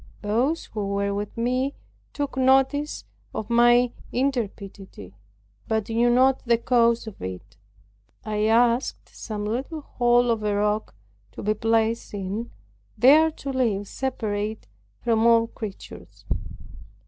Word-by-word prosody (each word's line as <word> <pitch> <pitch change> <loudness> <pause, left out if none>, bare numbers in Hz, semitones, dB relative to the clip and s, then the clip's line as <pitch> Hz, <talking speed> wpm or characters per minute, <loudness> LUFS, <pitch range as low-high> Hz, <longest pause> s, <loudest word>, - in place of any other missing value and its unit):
Those 245 +10 0
who 210 -2 -4
were 200 0 0
with 205 +2 -5
me, 255 +4 0 0.4
took 285 -2 -4
notice 270 +3 +2 0.3
of 220 - -4
my 240 +1 +5 0.2
intrepidity, 200 - -4 0.5
but 220 -1 -1
knew 235 +2 +2
not 260 +2 +4
the 235 -2 +3
cause 235 -1 +2
of 220 -3 -10
it. 95 +2 -7 0.7
I 215 0 -1
asked 235 +2 +1
some 210 -2 -5
little 265 +9 -3
hole 240 -2 +2
of 225 -1 -1
a 210 -1 0
rock 210 - -1 0.4
to - - -8
be 210 +1 +2
placed 225 0 0
in, 200 +4 -4 0.5
there 305 +6 +6
to 280 -3 -6
live 215 -6 0
separate 220 -5 -3 0.4
from 230 -1 +3
all 230 -1 +5
creatures. 215 -3 -10
230 Hz, 125 wpm, -24 LUFS, 210-250 Hz, 0.7 s, there